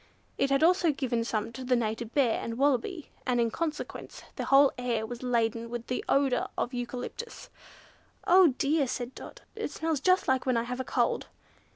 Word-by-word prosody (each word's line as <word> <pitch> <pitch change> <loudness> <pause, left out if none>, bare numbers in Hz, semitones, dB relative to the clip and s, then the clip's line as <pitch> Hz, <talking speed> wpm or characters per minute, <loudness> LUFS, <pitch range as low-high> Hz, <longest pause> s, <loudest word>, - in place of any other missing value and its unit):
It 275 - +2
had 275 +2 +2
also 350 -1 +4
given 250 -5 -1
some 225 -1 -2
to 255 +3 -8
the 250 0 +2
Native 225 0 -2
Bear, 260 -6 +2
and 230 0 -4
Wallaby, 285 +5 0 0.2
and 250 -1 +2
in 230 -1 +2
consequence 315 +1 -5
the - - -3
whole 275 0 +6
air 240 -3 -1
was 240 +1 -7
laden 235 -2 0
with 240 0 -5
the 250 - -3
odour 275 -2 +2
of 250 - -2
eucalyptus. 250 - -6 0.7
"Oh, 355 -6 +6
dear!" 285 0 +2
said 245 +1 -4
Dot, - - -11
"it 440 -6 -3
smells 320 0 -2
just 365 +6 +3
like 260 -1 +2
when 255 -2 +2
I 230 - +1
have 250 +2 -5
a - - -1
cold!" - - 0
255 Hz, 190 wpm, -29 LUFS, 235-290 Hz, 0.7 s, whole